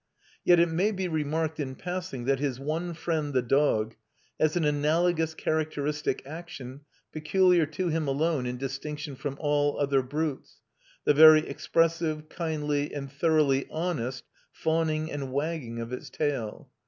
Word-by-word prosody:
Yet 175 -1 +6
it 170 0 +4
may 180 +6 +1
be 190 -3 -2
remarked 160 0 -1
in 130 -3 -3
passing 180 -8 -5
that 135 0 +2
his 135 -3 -2
one 160 +5 -3
friend 155 -4 -2
the 125 - +3
dog 120 -4 +2 0.5
has 155 +1 +2
an 170 -3 +1
analogous 160 +2 +1
characteristic 150 -3 -1
action 145 -4 -8 0.3
peculiar 175 +1 +3
to 170 +4 -2
him 160 -2 -1
alone 140 -1 0
in 125 0 -3
distinction 140 +3 -5
from 140 +1 -5
all 145 -1 +1
other 140 -2 +2
brutes, 145 +2 -3 0.5
the - - +5
very 155 +1 +8
expressive, 165 -2 0
kindly, 150 -3 -2
and 140 -2 -5
thoroughly 145 -2 +2
honest 145 -7 -3 0.3
fawning 160 -1 0
and 140 -3 -4
wagging 140 -5 -3
of 115 +2 -5
its 125 - -6
tail. 135 -8 -3
150 Hz, 145 wpm, -28 LUFS, 140-160 Hz, 0.5 s, very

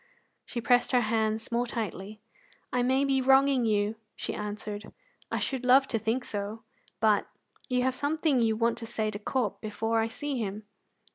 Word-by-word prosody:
She 240 - -4
pressed 245 +2 +3
her 250 - +5
hands 220 0 0
more 240 +1 +1
tightly. 215 -2 -5 0.5
"I 250 - +2
may 260 +3 +2
be 270 -1 +2
wronging 265 -1 +4
you," 210 0 +1 0.2
she - - -4
answered; 210 0 -5 0.4
"I - - -1
should 265 -2 -2
love 265 +2 +6
to 225 - 0
think 225 +4 -1
so; 205 +2 -5 0.4
but 215 -2 +3 0.4
you 250 -1 +2
have 260 0 +2
something 290 0 +1
you 225 -2 +2
want 230 +1 +1
to 230 - -7
say 220 -2 -1
to 205 - -6
Corp 225 -1 -1
before 225 +1 -1
I 225 - +1
see 265 +3 -4
him." 210 -1 -3
230 Hz, 180 wpm, -29 LUFS, 215-255 Hz, 0.5 s, love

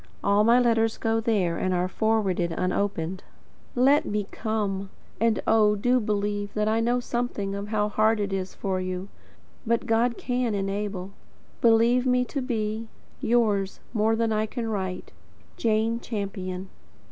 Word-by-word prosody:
All 200 +1 +4
my 235 +3 +5
letters 225 -2 +2
go 225 0 +1
there, 200 -7 +1
and 185 -1 0
are 180 +1 +1
forwarded 195 -4 0
unopened. 185 0 -1 0.5
LET 275 +4 +5
ME 210 -1 -2
COME. 200 -3 -2 0.3
And 225 -1 +2
oh, 215 -1 +4
do 245 +5 +2
believe 205 -1 -1
that 210 0 +1
I 220 +1 +2
know 240 +2 +2
something 240 -5 -2
of 200 +1 -4
how 210 -1 +1
hard 215 +1 +2
it 200 -1 -2
is 190 -1 -3
for 190 -1 -2
you. 185 +1 -4 0.5
But 235 -1 0
God 235 +2 +2
can 245 -3 -1
"enable." 195 -1 -3 0.5
Believe 235 +2 +4
me 250 0 +3
to 275 +2 -3
be, 225 -3 -2 0.3
Yours, 210 -5 +1
more 220 0 +2
than 225 -1 +1
I 215 0 0
can 230 0 -4
write, 190 -4 -3 0.4
Jane 225 +1 +1
Champion. 195 -4 -5
215 Hz, 150 wpm, -26 LUFS, 195-230 Hz, 0.5 s, my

